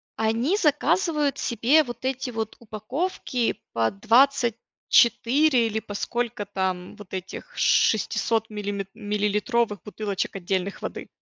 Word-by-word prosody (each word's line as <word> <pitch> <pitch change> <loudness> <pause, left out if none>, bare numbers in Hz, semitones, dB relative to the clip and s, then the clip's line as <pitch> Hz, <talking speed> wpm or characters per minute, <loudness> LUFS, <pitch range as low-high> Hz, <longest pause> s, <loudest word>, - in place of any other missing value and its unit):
Они 230 - +1
заказывают 300 -2 +1
себе 250 +7 +3
вот 240 -2 -8
эти 260 -1 -2
вот 220 -1 -4
упаковки 240 - -3
по 115 -1 +1
24 240 +2 +3
или 220 0 -2
по 205 - -9
сколько 235 0 -2
там 185 -2 -3
вот 200 -2 -13
этих 190 - -7
шестисот 225 -1 +2
миллим 205 -2 -4
миллилитровых 210 +1 0
бутылочек 205 -2 -3
отдельных 190 +1 -2
воды. - - -6
225 Hz, 110 wpm, -25 LUFS, 205-260 Hz, -, себе